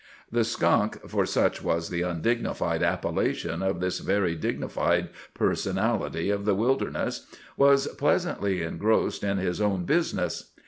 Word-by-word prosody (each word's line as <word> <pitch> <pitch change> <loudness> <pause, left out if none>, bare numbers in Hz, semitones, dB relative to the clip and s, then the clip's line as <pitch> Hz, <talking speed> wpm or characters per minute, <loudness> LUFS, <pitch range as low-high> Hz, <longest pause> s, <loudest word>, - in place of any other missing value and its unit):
The - - +2
skunk—for - - +1
such - - +1
was 85 0 -1
the 85 -1 -2
undignified 90 +7 -1
appellation - - -1
of 95 -2 0
this 90 0 -1
very 95 -4 +1
dignified 80 - -1 0.3
personality 85 +5 0
of 100 0 -1
the 105 -2 +3
wilderness—was 135 +3 +1
pleasantly 100 - +1
engrossed 105 +8 0
in 100 -1 0
his 95 +1 -1
own 100 -4 +1
business. - - -1
100 Hz, 120 wpm, -27 LUFS, 90-110 Hz, 0.3 s, the